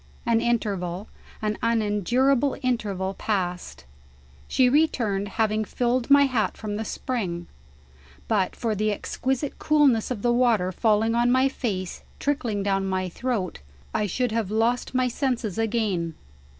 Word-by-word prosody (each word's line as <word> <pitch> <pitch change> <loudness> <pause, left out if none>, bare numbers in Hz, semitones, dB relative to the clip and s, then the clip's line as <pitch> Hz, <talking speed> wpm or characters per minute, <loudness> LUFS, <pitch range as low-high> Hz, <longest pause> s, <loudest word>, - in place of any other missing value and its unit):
An 230 -1 +3
interval, 200 -5 -1 0.3
an 215 0 -1
unendurable 235 +5 +2
interval, 200 -6 -1
passed. 180 - -3 0.6
She 255 - +3
returned, 235 -8 +1
having 220 -1 +2
filled 245 +4 -1
my 280 0 +7
hat 250 -6 0
from 210 -1 -4
the 220 - -2
spring. 190 -9 -3 0.8
But 185 - +1
for 230 -3 -1
the 215 +1 0
exquisite 265 +6 -2
coolness 285 -7 +3
of 235 -6 -4
the 240 0 +3
water 230 -7 +3
falling 220 +3 +2
on 240 +1 +3
my 260 +1 +4
face, 195 -9 -3 0.2
trickling 240 -8 -1
down 195 -1 0
my 185 -1 -1
throat, 215 -2 -3 0.3
I 210 - +1
should 245 +5 -1
have 220 -3 -1
lost 230 +4 0
my 255 0 +3
senses 240 -5 -2
again. 205 -8 0
225 Hz, 135 wpm, -25 LUFS, 195-250 Hz, 0.8 s, my